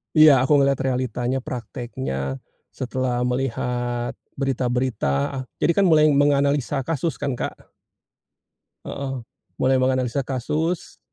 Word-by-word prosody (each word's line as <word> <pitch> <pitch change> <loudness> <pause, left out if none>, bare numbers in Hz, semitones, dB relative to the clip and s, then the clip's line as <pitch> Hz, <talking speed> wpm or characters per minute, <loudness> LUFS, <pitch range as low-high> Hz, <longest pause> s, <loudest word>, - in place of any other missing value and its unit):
Iya, 155 -1 +9
aku 150 - +3
ngelihat 140 0 +3
realitanya, 130 0 -1
praktiknya, 120 - -4 0.3
setelah 125 -1 -2
melihat 120 -1 -1 0.2
berita-berita, 125 - 0 0.3
ah, - - -6
jadi, 170 - +2
kan, 200 +2 +3
mulai 155 -1 +6
menganalisa 140 -2 +2
kasus, 165 -2 -1
kan, 140 -2 -2
Kak. - - -5 1.2
Heeh. 135 -3 -4 0.3
Mulai 130 0 +2
menganalisa 130 0 +1
kasus, 155 +6 -2
130 Hz, 110 wpm, -23 LUFS, 125-140 Hz, 1.2 s, Iya